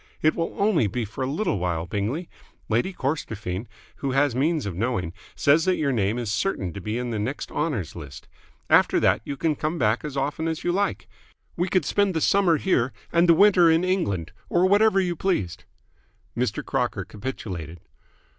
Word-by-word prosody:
"It 155 - +4
will 165 0 -3
only 200 - +3
be 115 +4 -2
for 110 +5 -5
a - - -1
little 155 - -1
while, 85 -2 -1
Bingley. 105 - -3 0.4
Lady 120 - +1
Corstorphine, 110 - -3 0.3
who 135 -2 -2
has 140 -1 +3
means 150 +2 +1
of 100 - -3
knowing, 95 -5 -1 0.2
says 155 +3 +3
that 185 -1 +3
your 145 -3 0
name 110 -2 0
is 120 -4 -2
certain 95 - -1
to 100 - -7
be 105 +5 -3
in 125 -1 -3
the 110 - -2
next 125 +7 -4
Honours 140 - -2
List. 75 -5 -10 0.4
After - - +4
that - - +3
you 140 - -5
can 160 +3 +1
come 155 +4 -2
back 110 -3 +1
as 145 -2 -5
often 145 +4 -1
as 160 -1 -3
you 175 - +1
like. 200 +3 -1 0.5
We 175 +2 -1
could 185 -6 +2
spend 200 +1 +1
the - - +2
summer 185 -3 +3
here 130 -8 +1 0.2
and 170 +1 +4
the 165 - +8
winter 180 -2 +6
in 165 +2 +3
England, 165 - -1 0.2
or 175 +1 +3
whatever 205 +1 +4
you 180 -2 0
pleased." 95 - -2 0.7
Mr. 120 -2 -1
Crocker - - -1
capitulated. 95 - -6
140 Hz, 190 wpm, -25 LUFS, 105-170 Hz, 0.7 s, the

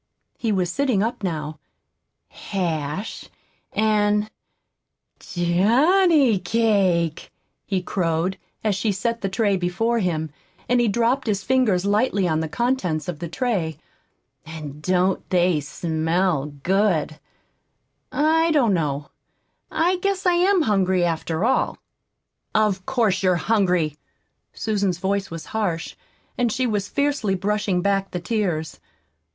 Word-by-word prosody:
He 225 - 0
was 185 -3 0
sitting 250 -4 +1
up 230 0 -3
now. 155 -4 -3 0.7
"Hash 170 0 -4 0.4
and 210 0 +1 0.9
johnny 240 - +3
cake!" 185 -5 +1 0.4
he 190 -3 -1
crowed, 180 +1 -1 0.2
as 215 -2 +2
she 200 +3 0
set 230 +4 -2
the 195 - -1
tray 200 0 +1
before 195 +7 0
him, 160 -6 -1 0.4
and 245 0 +3
he 240 - +2
dropped 235 +5 +1
his 205 -2 0
fingers 230 -8 +2
lightly 205 -2 +2
on 160 -2 +1
the 160 -1 -3
contents 190 -7 -1
of 175 -4 -4
the 170 - -4
tray. 175 - -1 0.7
"And 150 -2 -8
don't 185 +2 0
they 175 -3 +3
smell 160 +1 -1
good! 155 +1 0 0.9
I 320 +2 +3
don't 265 -10 +3
know 150 -4 -2 0.6
I 355 +3 +1
guess 390 +1 -1
I 360 - +4
am 360 0 +3
hungry, 190 -5 +2
after 165 +2 -1
all." 260 - +1 0.8
"Of 205 -4 +1
course 225 -8 +1
you're 185 -2 +3
hungry!" 180 -5 +1 0.6
Susan's 200 -5 -1
voice 195 +2 -1
was 165 -1 -7
harsh, 180 -7 -2 0.4
and 240 -2 +2
she 255 +4 0
was 205 -4 -1
fiercely 280 -9 0
brushing 195 -1 0
back 195 -1 +1
the 180 - -4
tears. 175 -6 -2
195 Hz, 125 wpm, -23 LUFS, 175-225 Hz, 0.9 s, I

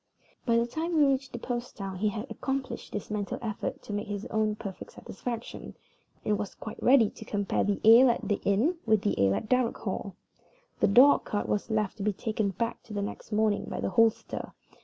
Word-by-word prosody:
By 230 -1 +4
the 235 - +3
time 320 +8 -3
we 295 - +6
reached 270 -1 0
the - - -5
post 240 +1 -5
town 195 -2 -5
he 210 +3 +1
had 210 +2 -4
accomplished 270 0 -4
this 210 0 -5
mental 205 -2 -2
effort 220 -3 -4
to 210 - -6
his 205 -1 -5
own 215 -1 +1
perfect 200 -4 -8
satisfaction, 235 +3 -6 0.5
and 210 -1 +1
was 205 - -5
quite 215 - -8
ready 245 -4 +5
to - - -11
compare 205 -2 -1
the 200 0 0
ale 240 +3 +9
at 235 - -1
the 205 - 0
inn 235 - +2
with 220 -2 +3
the 205 - +1
ale 100 0 +3
at - - -4
Darrock 250 -1 +2
Hall. 195 -2 -4 0.6
The - - +4
dog 250 +8 +6
cart 205 - -2
was 210 - -1
left 215 -2 -1
to 200 - -4
be 210 0 +1
taken 215 +1 -1
back 230 +5 -3
the 210 -2 -6
next 200 +2 -6
morning 210 -1 +1
by - - -5
the - - -2
hostler. 225 +3 +1
215 Hz, 205 wpm, -28 LUFS, 205-240 Hz, 0.6 s, ale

